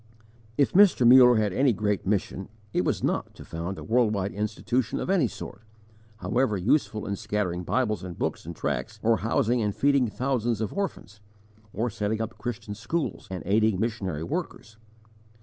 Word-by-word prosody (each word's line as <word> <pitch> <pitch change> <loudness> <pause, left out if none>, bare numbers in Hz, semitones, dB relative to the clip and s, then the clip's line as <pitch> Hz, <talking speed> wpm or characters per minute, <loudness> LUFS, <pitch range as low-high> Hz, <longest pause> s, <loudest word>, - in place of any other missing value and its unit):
If 140 - +2
Mr. 190 -11 +6
Muller 125 0 +8
had 105 -3 +1
any 130 +3 +3
great 105 -3 -1
mission, 95 -1 -1 0.2
it - - +1
was - - -1
not - - -1
to - - -11
found 85 +3 -5
a - - -7
world 115 -2 +2
wide 100 0 -2
institution 110 +3 -1
of - - -2
any 175 -10 +3
sort, 100 - -9 0.6
however 120 -1 0
useful 110 +2 +1
in 100 - -2
scattering 100 -4 -2
Bibles 110 0 0
and 90 -2 -7
books - - -2
and 85 +1 -7
tracts, 110 +6 -3
or 115 0 +4
housing 115 +2 +1
and 105 -2 -1
feeding 140 -3 +3
thousands 120 -1 -1
of 110 - -3
orphans, 195 - -4 0.5
or 115 +4 -2
setting 105 0 -2
up 110 -1 -5
Christian 115 -3 -5
schools 115 +10 -3
and 95 -1 -5
aiding 105 0 +2
missionary 100 -9 -2
workers. 125 - -5
110 Hz, 170 wpm, -26 LUFS, 100-125 Hz, 0.6 s, Muller